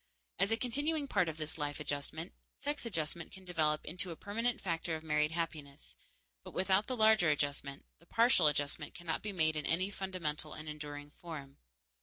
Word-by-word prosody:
As 195 +1 +3
a 225 - +3
continuing 285 +5 0
part 180 -9 +3
of 160 - -5
this 155 +1 -5
life 145 -1 -1
adjustment, 155 +4 -3 0.3
sex 290 -4 -2
adjustment 165 -4 -2
can 190 -1 -11
develop 155 -4 +1
into 180 +1 -1
a 165 - -4
permanent 230 +7 -1
factor 165 -2 -1
of 155 - -6
married 150 -1 +3
happiness; 155 -4 -4 0.5
but - - -10
without 190 +2 +3
the 255 - -2
larger 215 -6 +6
adjustment, 145 -1 -1
the - - -22
partial 230 -8 +6
adjustment 145 -1 0
cannot 175 -2 -2
be 210 - -3
made 160 -4 +2
in 150 -2 -2
any 185 +5 +2
fundamental 170 -6 -3
and 155 0 -7
enduring 145 -1 -6
form. 145 -6 -8
165 Hz, 180 wpm, -35 LUFS, 150-195 Hz, 0.5 s, larger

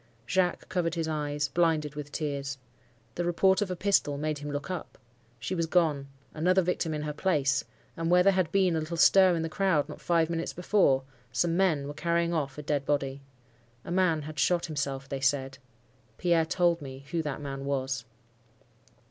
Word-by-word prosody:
"Jacques 180 +6 0
covered 170 -2 -1
his 165 -1 -1
eyes, 145 -1 -2
blinded 155 -1 +1
with 145 -1 -7
tears. 140 -3 -3 0.6
The 175 - -2
report 190 +3 +3
of 205 - -1
a 180 - -2
pistol 180 -6 +1
made 150 0 -2
him 145 +1 -6
look 145 +5 -4
up. 180 -3 -6 0.4
She 120 +11 -3
was 165 -2 0
gone—another 155 +2 +1
victim 170 -2 -1
in 150 - -3
her 150 0 -3
place—and 150 0 -1
where 180 +1 +5
there 195 +1 +5
had 185 -4 0
been 190 -3 +3
a - - +1
little 160 +2 -4
stir 185 +1 +6
in 165 - -1
the - - -1
crowd 160 -3 +1
not 150 - -10
five 165 -2 +2
minutes 165 0 -3
before, 180 -7 +2 0.3
some 165 +8 +1
men 165 -7 +2
were 145 - -5
carrying 170 +2 0
off 140 -4 -2
a 150 - -6
dead 145 -1 -1
body. 140 -1 -1 0.6
A - - -6
man 175 -4 +2
had 155 0 -7
shot 175 +5 +2
himself, 140 -3 -3
they 135 -1 -4
said. 135 -1 0 0.6
Pierre 170 -2 +2
told 170 -1 +2
me 135 -1 -9
who 170 -1 0
that 150 -3 -4
man 135 -1 -5
was." 135 -2 -2
155 Hz, 185 wpm, -28 LUFS, 140-175 Hz, 0.6 s, stir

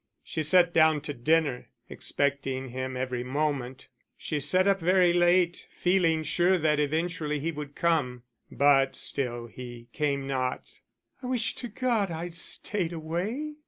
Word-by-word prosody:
She 160 - -4
sat 170 +2 +4
down 155 -2 +4
to 150 0 -5
dinner, 145 0 0 0.2
expecting 135 -2 -2
him 130 +1 -4
every 125 -1 -3
moment; 135 -1 -3 0.3
she 150 - -3
sat 185 +7 +2
up 195 -1 +3
very 180 0 +3
late, 175 0 +2
feeling 175 -3 +1
sure 175 +5 +2
that 155 -2 +1
eventually 155 +1 -1
he 165 +4 -2
would 150 -2 -8
come. 145 -8 0 0.3
But 140 -1 +3
still 120 -4 -3
he 120 0 -10
came 140 -3 -1
not. 130 -2 -3 0.4
"I 250 - -6
wish 245 -3 0
to 245 - -6
God 225 -3 0
I'd 170 +1 -5
stayed 175 +1 0
away." 195 - -4
155 Hz, 145 wpm, -27 LUFS, 135-175 Hz, 0.4 s, sat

